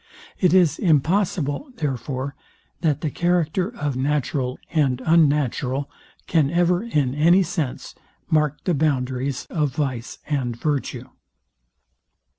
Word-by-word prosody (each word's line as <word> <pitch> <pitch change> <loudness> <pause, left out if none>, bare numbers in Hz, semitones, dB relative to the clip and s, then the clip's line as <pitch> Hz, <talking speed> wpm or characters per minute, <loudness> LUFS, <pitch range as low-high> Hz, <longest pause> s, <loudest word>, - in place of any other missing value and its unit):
It 180 -4 +4
is 180 -4 +4
impossible, 170 - +1
therefore, 135 - -3 0.5
that 150 -3 0
the 155 - -2
character 175 +2 +1
of 145 - -3
natural 135 -1 -1 0.2
and 135 -6 +2
unnatural 145 -4 +2 0.3
can 155 -4 +2
ever, 175 +2 +2
in 145 - 0
any 170 +6 +5
sense, 165 -6 -4 0.3
mark 150 -2 +1
the 180 - +1
boundaries 135 -3 -1
of 150 -5 -1
vice 130 -5 -3
and 130 -5 -1
virtue. 145 +1 -2
150 Hz, 110 wpm, -23 LUFS, 135-170 Hz, 0.5 s, any